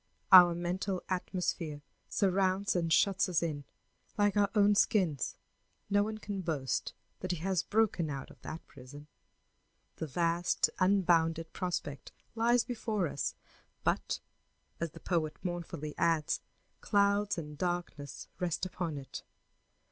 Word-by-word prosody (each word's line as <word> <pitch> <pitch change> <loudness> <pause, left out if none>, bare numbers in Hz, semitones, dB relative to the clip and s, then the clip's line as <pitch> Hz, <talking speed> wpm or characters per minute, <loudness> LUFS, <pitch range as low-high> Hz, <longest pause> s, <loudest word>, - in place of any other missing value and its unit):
Our 175 -2 +10
mental 180 +2 -2
atmosphere 175 -5 -2 0.3
surrounds 195 0 +1
and 170 -2 0
shuts 195 +3 +3
us 175 -2 +1
in 145 -4 -3 0.5
like 205 -1 +3
our 205 -1 +3
own 205 0 +5
skins; 185 - +2 0.6
no 205 0 +5
one 215 +1 -2
can 205 -2 -4
boast 145 -8 -2 0.2
that 185 - -5
he 175 - 0
has 180 +2 0
broken 205 -6 +1
out 135 -2 -5
of - - -18
that 160 - -7
prison. 140 +3 -12 0.9
The 160 - -3
vast, 170 +4 +1
unbounded 170 -4 +2
prospect 150 -7 -4 0.2
lies 235 +1 +3
before 215 -6 -1
us, 140 - -3 0.5
but, - - 0 0.6
as 170 - -1
the - - -13
poet 160 -4 -1
mournfully 170 -4 -4
adds, 165 -3 +2 0.4
"clouds 200 -1 +2
and 150 -2 -6
darkness 175 -4 -4
rest 180 0 -1
upon 175 -4 -3
it." 135 -1 -7
175 Hz, 130 wpm, -32 LUFS, 160-200 Hz, 0.9 s, Our